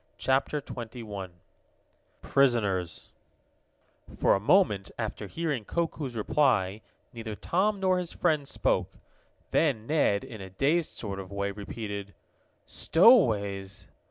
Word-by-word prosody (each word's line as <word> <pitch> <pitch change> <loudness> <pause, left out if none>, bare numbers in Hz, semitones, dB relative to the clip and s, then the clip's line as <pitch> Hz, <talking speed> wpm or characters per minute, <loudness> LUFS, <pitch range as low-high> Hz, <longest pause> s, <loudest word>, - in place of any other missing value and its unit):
CHAPTER 135 +3 +1
XXI 110 -7 -7 0.9
PRISONERS 105 -10 +1 1.1
For - - +4
a - - +2
moment, 105 - +3
after 110 -2 -4
hearing 150 - -2
Koku's 155 -2 -3
reply, 110 -5 +1 0.3
neither 115 -2 -6
Tom 195 - 0
nor 185 -1 +2
his 175 -2 -4
friends 155 -5 0
spoke. - - 0 0.6
Then 135 -9 +1
Ned, 120 -8 +2
in 110 -3 -9
a 95 - -8
dazed 150 - +1
sort 100 -3 -6
of 95 0 -8
way, 100 0 -2
repeated: 100 -1 -6 0.5
"Stowaways!" 105 - +3
115 Hz, 110 wpm, -28 LUFS, 100-150 Hz, 1.1 s, For